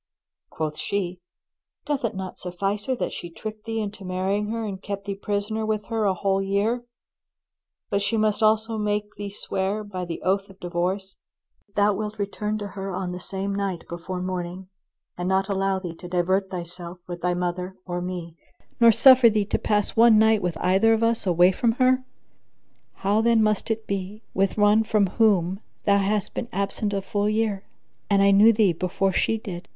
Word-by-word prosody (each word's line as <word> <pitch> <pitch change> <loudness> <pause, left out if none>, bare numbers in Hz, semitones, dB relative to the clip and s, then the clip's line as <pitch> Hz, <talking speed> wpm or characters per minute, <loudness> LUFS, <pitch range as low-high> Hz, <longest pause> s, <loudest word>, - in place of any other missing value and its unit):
Quoth 155 -1 -4
she, 185 -3 -2 0.7
"Doth 290 -3 -1
it 230 -2 -1
not 190 -1 -6
suffice 195 +4 -2
her 260 - +1
that - - -3
she 175 - -6
tricked 215 +5 -8
thee 225 0 -2
into 205 -1 -5
marrying 190 +3 -1
her 225 +1 -3
and 195 -2 -5
kept 200 -1 -5
thee 200 - -2
prisoner 205 +2 -2
with 215 -1 -1
her 225 -2 0
a 190 -2 +2
whole 195 +1 +1
year, 200 +5 0 1.1
but 200 0 +1
she 225 +3 0
must 215 -1 +1
also 220 +1 +2
make 210 0 -1
thee 205 0 -5
swear 200 +1 -2
by 190 -3 -5
the 170 -1 -6
oath 195 +2 0
of 195 0 -16
divorce, 185 +2 -2 0.5
that 200 - -37
thou 205 0 +4
wilt 215 +1 -4
return 210 +1 -2
to 205 -1 -5
her 195 -1 -5
on 180 -1 -3
the 180 - -5
same 195 +2 -4
night 195 -4 -2
before 180 +2 -5
morning, 185 0 -4 0.5
and 180 +1 -1
not 190 0 +2
allow 195 -1 +1
thee 180 -3 -5
to 180 +2 -10
divert 185 +2 +1
thyself 175 -1 -7
with 175 -1 -7
thy 180 0 +1
mother 180 +1 -3
or 175 -1 -3
me, 175 -2 -5 0.5
nor 235 -1 +8
suffer 255 +1 +7
thee 210 -2 +1
to - - -1
pass 210 -1 0
one 230 -1 +7
night 220 -1 +4
with 175 -2 -2
either 190 +6 +3
of 225 0 +1
us, 230 -3 +1
away 175 +1 +5
from 225 +4 +1
her? 255 +1 +3 0.9
How 205 +3 +1
then 230 -1 +4
must 215 +1 0
it 225 0 -2
be 200 +2 -4
with 195 +1 +1
one 210 +1 +5
from 215 -2 +2
whom 190 -3 +2 0.3
thou 200 -1 +4
hast 200 +1 0
been 235 - -4
absent 200 +2 -1
a 195 -1 -2
full 205 +1 0
year, 215 -2 -1 0.4
and 200 -1 +4
I 200 - +5
knew 205 +3 +7
thee 210 -5 +3
before 185 +3 -1
she 225 - +1
did? 190 -6 -7
200 Hz, 195 wpm, -24 LUFS, 185-215 Hz, 1.1 s, nor